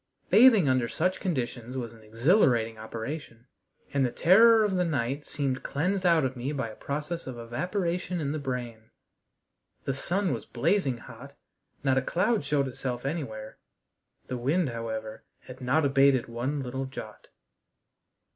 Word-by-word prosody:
Bathing 215 - +7
under 130 -2 +2
such 185 +9 -1
conditions 125 - -3
was 120 -3 -4
an 115 - -16
exhilarating 115 - +2
operation, 115 +2 -6 0.5
and 140 -1 +2
the 125 - +2
terror 220 - +6
of 205 -3 0
the 180 - +2
night 140 -3 -2
seemed 135 -3 -2
cleansed 185 +6 0
out 165 -4 +4
of 130 0 -2
me 125 +3 -3
by 130 -5 -2
a 110 - -10
process 150 +4 -4
of 130 -2 -6
evaporation 175 - -2
in 145 -3 -1
the 155 - -2
brain. 120 -5 -5 1.0
The 135 - 0
sun 185 +8 0
was - - -6
blazing 160 -12 +1
hot; 140 +5 -12 0.5
not 135 -1 +3
a - - -2
cloud 190 - +1
showed 140 -1 +1
itself 125 -1 -4
anywhere; 120 -8 -5 0.7
the 125 - -4
wind, 145 +6 +1
however, 110 -2 -5 0.2
had 130 +1 -12
not 140 +5 +2
abated 135 -2 +4
one 125 +5 -2
little 130 +1 -4
jot. 110 -5 -9
135 Hz, 155 wpm, -28 LUFS, 120-170 Hz, 1.0 s, Bathing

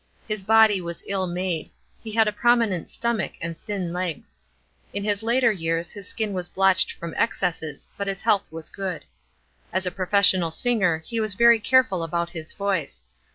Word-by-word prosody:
His 215 -3 -2
body 220 -2 +5
was 170 -1 -6
ill 190 -2 -1
made; 175 -2 -3 0.3
he 220 - -7
had 220 0 +4
a - - +2
prominent 225 -4 +1
stomach 235 -4 -1
and 170 0 -5
thin 185 -2 -5
legs. 180 -4 -5 0.6
In 200 - -2
his 205 0 0
later 235 +1 +3
years 165 -3 -2
his 200 -2 -9
skin 215 -3 -2
was 180 -1 -3
blotched 190 -1 +3
from 170 -1 -7
excesses; 170 -9 -2
but 200 - -3
his 195 -1 -3
health 210 -7 +1
was 160 0 -6
good. 190 -5 -5 0.7
As 185 +1 -1
a 180 - -1
professional 185 -2 +4
singer, 180 -4 +1
he 230 - -3
was 215 -3 -1
very 235 +1 +6
careful 255 -6 +3
about 170 +1 -2
his 160 -2 -6
voice. 185 - -3
190 Hz, 175 wpm, -24 LUFS, 170-215 Hz, 0.7 s, very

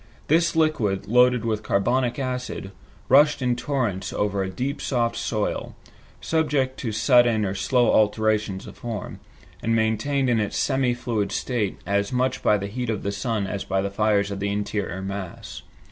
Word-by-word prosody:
This 165 +2 +3
liquid, 120 -12 +1
loaded 125 0 +4
with 110 -2 -1
carbonic 120 +5 +1
acid, 125 -7 -4 0.4
rushed 145 +3 +5
in 125 -2 +1
torrents 120 -8 -2
over 100 -1 -1
a 95 - -2
deep 130 +9 -3
soft 120 -3 0
soil, 105 -2 -2 0.4
subject 145 -5 0
to 115 - -3
sudden 115 -1 +4
or 95 - -2
slow 120 +5 +2
alterations 105 -2 +1
of - - -10
form, 115 -3 -6 0.4
and 115 0 +1
maintained 120 +5 +1
in 120 -2 +2
its 105 -2 -2
semi 130 -2 +1
fluid 115 -4 -2
state 115 -6 -2
as 100 +2 0
much 130 +1 0
by 105 - +3
the 100 - -4
heat 120 +4 -4
of 110 - -2
the 100 - -1
sun 105 0 -2
as 100 +1 -4
by 95 - -1
the 100 +1 -2
fires 100 -1 +1
of 100 - -4
the 100 +1 -1
interior 100 -2 -3
mass. 95 -2 -6
110 Hz, 170 wpm, -24 LUFS, 100-125 Hz, 0.4 s, rushed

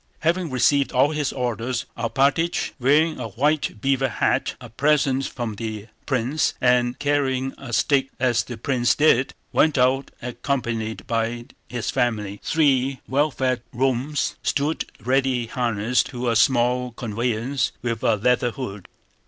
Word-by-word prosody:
Having 170 +2 +1
received 140 +2 +2
all 130 +4 +3
his 150 -3 -1
orders 120 -1 -2
Alpátych, 140 +8 +1
wearing 150 +5 +3
a - - -3
white 145 -2 0
beaver 135 +1 +2
hat—a 120 +2 -1
present 135 +1 +2
from 115 -4 -5
the 110 -1 -5 0.2
prince—and 125 -2 +1
carrying 135 -2 0
a 130 -3 -8
stick 135 +3 +2
as 125 -2 +2
the 120 -1 -8
prince 120 +1 +1
did, 140 -4 +3 0.2
went 155 -2 +3
out 130 +2 +2
accompanied 120 -3 -3
by 115 +1 -2 0.2
his 120 -3 -3
family. 105 -6 -1
Three 135 -4 +2
well 145 +3 +2
fed 130 -2 -1
roans 130 +3 -1
stood 145 +3 0
ready 130 +1 +1
harnessed 120 -1 0
to 125 -2 -2
a - - 0
small 125 +1 +2
conveyance 115 +3 -1
with 115 -2 -2
a 115 - +3
leather 120 +3 +2
hood. 105 -6 -7
125 Hz, 135 wpm, -23 LUFS, 120-140 Hz, 0.2 s, all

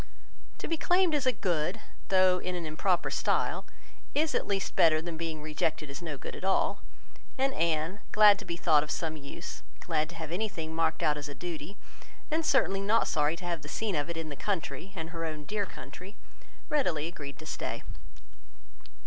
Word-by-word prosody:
To - - -5
be 330 - 0
claimed 355 0 +3
as 285 -3 +2
a - - +6
good, 170 -9 0 0.3
though 185 -1 +5
in 180 0 -3
an 175 -2 -3
improper 175 +3 +1
style, - - +1 0.5
is 310 +2 +2
at - - 0
least 195 -2 -1
better 155 -2 +6
than 165 +1 -4
being 160 -2 -4
rejected 155 -1 -1
as 140 - -7
no 160 -4 -4
good - - -7
at - - -9
all; 190 0 +2 0.6
and 270 +1 +2
Anne, 165 +3 +1
glad 210 -1 +8
to - - -8
be 170 -2 -3
thought 155 -4 +5
of 150 - -5
some 160 0 -1
use, 140 -2 -7 0.2
glad 155 -2 0
to 170 - -10
have 160 -1 -5
anything 175 -5 -2
marked 160 0 +1
out 150 -1 +3
as 145 0 -5
a 140 - -7
duty, 175 +2 -6 0.5
and 320 +1 +2
certainly 195 -10 +3
not 210 +3 +3
sorry 150 0 +2
to 175 - -9
have 170 -2 -1
the - - -9
scene 215 -4 -1
of 145 +1 0
it 170 - -3
in 160 -1 -3
the 145 - -5
country, 180 -1 -2
and 165 -2 -5
her 165 -1 -4
own 155 -2 -4
dear 205 +1 -1
country, 180 +9 -10 0.5
readily 180 - +1
agreed 145 -5 -6
to 155 - -10
stay. - - -4
170 Hz, 200 wpm, -30 LUFS, 155-195 Hz, 0.6 s, glad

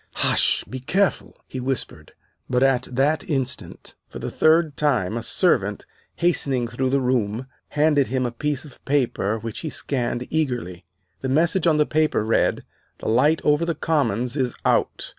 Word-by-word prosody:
"Hush! - - +3
be 130 - -7
careful!" 190 +10 0
he 130 - -6
whispered. 125 - -3 0.4
But 125 +1 +2
at 130 -2 +2
that 140 +5 +1
instant, 135 -4 -3 0.2
for - - -9
the - - -5
third 160 -1 +3
time, 120 -10 +1
a 115 - -2
servant, - - +1 0.3
hastening 140 -8 +1
through 130 +2 -2
the 140 +1 +2
room, 125 -2 0 0.2
handed 145 -2 +2
him 130 -1 -1
a 120 - -2
piece 145 +4 -2
of 145 - -16
paper 125 -6 0
which 115 0 -6
he 160 - -4
scanned 125 -4 -2
eagerly. 120 - -2 0.4
The 130 - -2
message 165 +5 +2
on 155 -2 +4
the 150 - +3
paper 155 -8 +1
read, 110 - +1 0.3
"The - - -4
light 145 +8 +3
over 150 +2 +3
the 170 -1 -1
Commons 125 -6 0
is 130 -4 -1
out. - - +1
130 Hz, 165 wpm, -23 LUFS, 120-150 Hz, 0.4 s, on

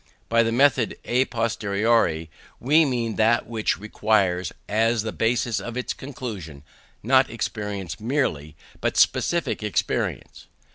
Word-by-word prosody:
By 115 +1 +4
the 115 0 +1
method 130 -1 +3
à 125 +2 +1
posteriori 110 -7 0 0.3
we 150 +6 +4
mean 120 -5 -2
that 115 +2 +3
which 115 -2 -1
requires, 100 -3 0 0.2
as 115 +1 +1
the 110 - -3
basis 115 -1 0
of 120 +5 -6
its 125 - -2
conclusions, 105 - -8 0.4
not 130 +3 +4
experience 105 -4 -4
merely, 105 - -1 0.2
but - - -1
specific 170 -8 +2
experience. 105 -2 -2
115 Hz, 125 wpm, -24 LUFS, 105-120 Hz, 0.4 s, By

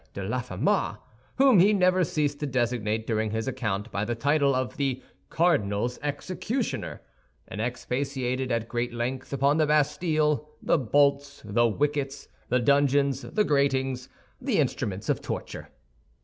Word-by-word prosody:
de 100 - -4
Laffemas, 125 +3 0 0.4
whom 265 -6 +6
he 200 +4 +6
never 185 -2 +3
ceased 145 -2 -1
to 150 - -2
designate, 120 -4 -1
during 110 -1 0
his 110 +3 -3
account, 110 -4 -2
by 100 - -1
the 120 +2 -2
title 140 +2 +2
of 130 +5 -2
the 135 -3 0 0.3
"cardinal's 125 - +1
executioner," 185 - -3 0.5
and 105 - -5
expatiated 130 +1 -2
at 115 -1 -1
great 120 +1 -2
length 130 +3 -3
upon 140 +2 +2
the 155 -1 +3
Bastille, 150 0 +1
the - - +2
bolts, 140 +3 +1
the 120 +3 +2
wickets, 140 +3 -2 0.2
the 125 - +3
dungeons, 140 +1 +3
the 130 - 0
gratings, 135 -4 0 0.3
the - - 0
instruments 100 0 -1
of - - 0
torture. - - -6
135 Hz, 140 wpm, -27 LUFS, 120-145 Hz, 0.5 s, whom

